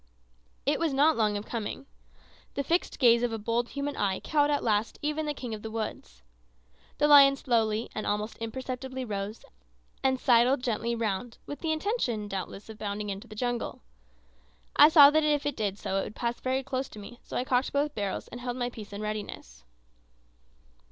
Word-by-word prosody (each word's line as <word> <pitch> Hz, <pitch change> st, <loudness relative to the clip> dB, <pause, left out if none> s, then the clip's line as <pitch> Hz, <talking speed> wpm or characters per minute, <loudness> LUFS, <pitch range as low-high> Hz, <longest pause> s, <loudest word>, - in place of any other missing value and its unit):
It 285 Hz, +2 st, +2 dB
was 325 Hz, -5 st, 0 dB
not 300 Hz, +3 st, +5 dB
long 210 Hz, -2 st, +1 dB
of 205 Hz, -, -6 dB
coming. 230 Hz, +3 st, -5 dB, 0.7 s
The 280 Hz, -, -1 dB
fixed 335 Hz, +6 st, 0 dB
gaze 235 Hz, -3 st, +5 dB
of 245 Hz, -1 st, 0 dB
a 225 Hz, -, -2 dB
bold 230 Hz, +3 st, -1 dB
human 280 Hz, +1 st, -3 dB
eye 195 Hz, -2 st, 0 dB
cowed 295 Hz, -1 st, +2 dB
at 290 Hz, -1 st, +1 dB
last 215 Hz, 0 st, 0 dB
even 300 Hz, +1 st, -1 dB
the 295 Hz, -, 0 dB
king 245 Hz, -4 st, -5 dB
of 215 Hz, -, -6 dB
the 220 Hz, -, -6 dB
woods. 65 Hz, -, -6 dB, 0.7 s
The 295 Hz, -, +3 dB
lion 280 Hz, -2 st, +8 dB
slowly 225 Hz, -4 st, 0 dB
and 215 Hz, -, -4 dB
almost 210 Hz, +2 st, -2 dB
imperceptibly 260 Hz, +2 st, -5 dB
rose, 205 Hz, 0 st, -5 dB, 0.6 s
and 265 Hz, -1 st, +2 dB
sidled 250 Hz, +2 st, +4 dB
gently 235 Hz, 0 st, -1 dB
round, 225 Hz, +1 st, -2 dB
with 290 Hz, -, -7 dB
the 320 Hz, -, -1 dB
intention, 310 Hz, -, -1 dB
doubtless, 195 Hz, +1 st, -6 dB
of 220 Hz, -1 st, -10 dB
bounding 205 Hz, 0 st, -3 dB
into 200 Hz, +4 st, -7 dB
the 215 Hz, -, -11 dB
jungle. 245 Hz, -, -3 dB, 0.9 s
I 295 Hz, -, +9 dB
saw 290 Hz, -3 st, +9 dB
that 310 Hz, +1 st, +3 dB
if 295 Hz, -1 st, +1 dB
it 290 Hz, -, -1 dB
did 205 Hz, -2 st, -2 dB
so 195 Hz, -, -2 dB
it -, -, -1 dB
would -, -, -9 dB
pass 240 Hz, -1 st, -2 dB
very 260 Hz, +1 st, -1 dB
close 265 Hz, 0 st, -3 dB
to -, -, -13 dB
me 225 Hz, +4 st, -10 dB
so -, -, -6 dB
I -, -, +1 dB
cocked 255 Hz, 0 st, +1 dB
both 285 Hz, +1 st, 0 dB
barrels 200 Hz, -5 st, -3 dB
and 245 Hz, -, -8 dB
held 245 Hz, 0 st, -3 dB
my 245 Hz, -1 st, -2 dB
piece 215 Hz, -4 st, -10 dB
in 200 Hz, -, -5 dB
readiness. 210 Hz, -, -6 dB
240 Hz, 195 wpm, -28 LUFS, 215-275 Hz, 0.9 s, I